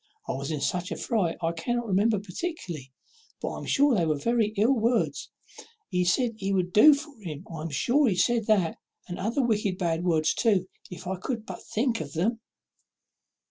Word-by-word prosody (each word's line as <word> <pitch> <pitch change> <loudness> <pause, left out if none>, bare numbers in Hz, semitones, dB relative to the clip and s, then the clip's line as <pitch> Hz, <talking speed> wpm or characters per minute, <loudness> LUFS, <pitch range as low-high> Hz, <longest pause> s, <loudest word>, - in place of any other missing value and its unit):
I - - -1
was 140 +1 -4
in 155 -3 -2
such 180 +5 -1
a - - -1
fright 200 -9 -1
I 165 - +2
cannot 240 +8 -2
remember 210 +2 +2
particularly, 180 - -5 0.5
but - - -3
I - - -6
am - - -8
sure 285 0 +4
they 175 -7 +2
were 155 -1 +1
very 230 +6 +1
ill 225 +6 +4
words; 235 -1 0 0.6
he 180 -2 +1
said 235 +7 +2
he 195 -2 -2
would 180 -2 0
do 295 +8 +8
for 300 +1 -8
him 160 -2 -7
I 155 - -6
am 165 - -4
sure 245 - +2
he 190 - 0
said 230 +3 +2
that, 195 -7 +2 0.3
and 175 - -6
other 230 +7 0
wicked 210 -5 0
bad 170 -2 -1
words 160 -3 +2
too, 200 -6 +2 0.2
if 180 +1 -9
I 190 +1 -2
could 225 +3 -4
but - - -8
think 230 -1 -1
of 140 -2 -7
them." 220 +8 0
195 Hz, 200 wpm, -27 LUFS, 170-235 Hz, 0.6 s, do